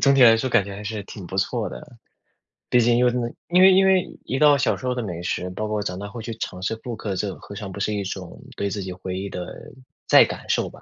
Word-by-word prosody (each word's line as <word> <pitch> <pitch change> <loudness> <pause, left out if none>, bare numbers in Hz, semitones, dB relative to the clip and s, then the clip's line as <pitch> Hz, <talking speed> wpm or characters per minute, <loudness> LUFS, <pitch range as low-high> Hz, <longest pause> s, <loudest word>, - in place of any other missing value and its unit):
总 140 -1 +5
体 135 - +5
来 115 -2 +8
说 130 +3 -1
感 100 - +4
觉 100 - -7
还 105 - -8
是 105 0 -4
挺 100 -4 -9
不 95 - -6
错 95 - 0
的， - - -8 0.9
毕 125 - +4
竟 120 +1 +3
因 125 - +4
为 125 - +4
真 125 0 -1
的 120 - -3 0.2
因 180 +1 +5
为 190 0 +9
因 190 +1 +5
为 190 -1 +3 0.2
一 130 - -2
道 145 -2 +6
小 130 - +1
时 130 - -9
候 125 - +1
的 125 - -2
美 85 -4 -5
食， 90 +1 -2
包 105 +3 -3
括 105 -1 -1
长 90 -2 -4
大 100 - -5
后 115 +2 -8
去 115 +1 -5
尝 90 -4 -6
试 105 +4 -1
复 120 -2 -4
刻， 100 -3 -4
这 95 0 -2
何 100 - -11
尝 100 -1 -6
不 100 - -7
是 105 +2 0
一 100 -1 -2
种 95 -2 -7 0.2
对 100 - -1
自 100 +1 -4
己 95 - -5
回 90 0 -5
忆 100 +1 -4
的 90 - -5 0.6
再 - - +8
感 - - -8
受 - - +1
吧。 - - -16
105 Hz, 315 characters per minute, -23 LUFS, 95-125 Hz, 0.9 s, 为